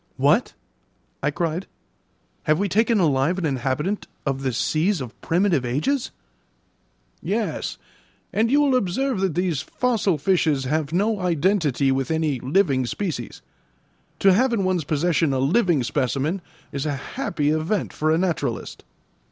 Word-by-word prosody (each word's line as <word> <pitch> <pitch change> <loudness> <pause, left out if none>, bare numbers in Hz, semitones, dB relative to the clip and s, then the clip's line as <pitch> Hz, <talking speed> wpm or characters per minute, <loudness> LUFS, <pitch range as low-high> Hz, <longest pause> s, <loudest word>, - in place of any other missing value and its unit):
"What!" - - +3 0.7
I 150 - +1
cried. 170 +4 -2 0.8
"Have 155 -1 +3
we 200 +3 0
taken 220 +3 +2
alive 155 +1 +2
an 185 - -1
inhabitant 140 - -1 0.2
of 135 -1 -1
the 135 -1 0
seas 160 - +1
of 125 -4 -8
primitive 170 -5 +2
ages?" 155 - 0 1.1
"Yes; - - -2 0.6
and 225 +2 +2
you 285 +3 +4
will 280 -3 +3
observe 250 +2 0
that 190 -5 0
these 175 -6 0
fossil 215 -3 0
fishes 155 -4 +1
have 150 +2 -1
no 205 +5 +1
identity 165 -6 +1
with 135 0 -1
any 160 -4 0
living 135 - +1
species. 155 - -4 0.8
To 195 -1 +6
have 245 +5 +3
in 205 -4 +1
one's 185 -4 0
possession 160 0 +1
a 130 - 0
living 165 - +2
specimen 140 +8 -1 0.3
is 140 +2 -3
a 145 - -1 0.2
happy 165 - 0
event 160 +6 -1
for 155 - 0
a 160 - +3
naturalist." 160 -9 -2
165 Hz, 145 wpm, -23 LUFS, 140-195 Hz, 1.1 s, To